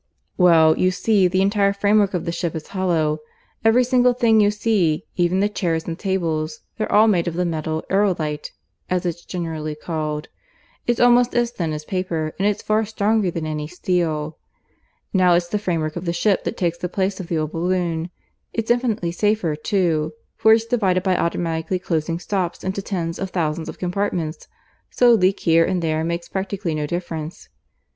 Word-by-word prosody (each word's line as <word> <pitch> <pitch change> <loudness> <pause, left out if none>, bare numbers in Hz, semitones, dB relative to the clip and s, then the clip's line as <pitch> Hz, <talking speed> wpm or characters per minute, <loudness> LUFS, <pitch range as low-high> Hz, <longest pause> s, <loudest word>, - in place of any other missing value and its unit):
"Well, 165 -3 +5
you 185 - +4
see 195 +1 +2
the 185 +1 +1
entire 200 0 +2
framework 200 -1 +2
of 175 - -2
the 170 - -1
ship 170 -1 -3
is 160 - -6
hollow. 165 -5 0 0.4
Every 225 +3 +5
single 250 0 +3
thing 225 -3 +4
you 205 - +4
see 205 -5 +1
even 180 +1 +2
the 205 - +3
chairs 170 -6 -2
and 165 - -4
tables 160 -5 -2 0.2
they're 215 - -2
all 215 +2 +6
made 180 -5 +2
of 170 - -2
the 180 +1 0
metal 160 -1 -2
aerolite 170 -7 0 0.4
(as 180 0 0
it's 170 -1 -3
generally 160 -4 -4
called). 155 -1 -4 0.6
It's 240 -1 +1
almost 245 0 +4
as 240 -1 +2
thin 170 -9 -3
as 150 0 -5
paper, 165 -4 -2
and 195 - +2
it's 210 - -1
far 215 +1 +2
stronger 215 -1 +1
than 165 -2 -4
any 150 -1 -3
steel. 165 -3 -2 0.7
Now 180 -2 +5
it's 175 0 0
the 210 - -1
framework 165 -6 -2
of 175 +1 -5
the 170 - -1
ship 195 +3 +1
that - - -3
takes 170 -2 -1
the 180 0 -3
place 190 +1 -1
of 185 - -6
the 165 - -1
old 155 -1 -2
balloon. 170 -1 -1 0.4
It's 225 0 -1
infinitely 230 -8 0
safer, 205 -4 0
too, 160 -3 0 0.2
for 220 - +4
it's 225 0 +2
divided 195 -7 +1
by 190 -2 +2
automatically 170 +1 -1
closing 165 -2 -2
stops 180 -1 -3
into 190 +1 -2
tens 170 -4 -3
of 190 - -3
thousands 160 -3 -2
of - - -8
compartments, 175 -4 -2 0.4
so 245 -1 +4
a - - +7
leak 195 -2 +2
here 165 0 +4
and 185 +1 0
there 160 -1 0
makes 170 +1 -3
practically 190 -3 -3
no 150 -1 -2
difference. 165 -1 -5
180 Hz, 185 wpm, -21 LUFS, 160-200 Hz, 0.7 s, a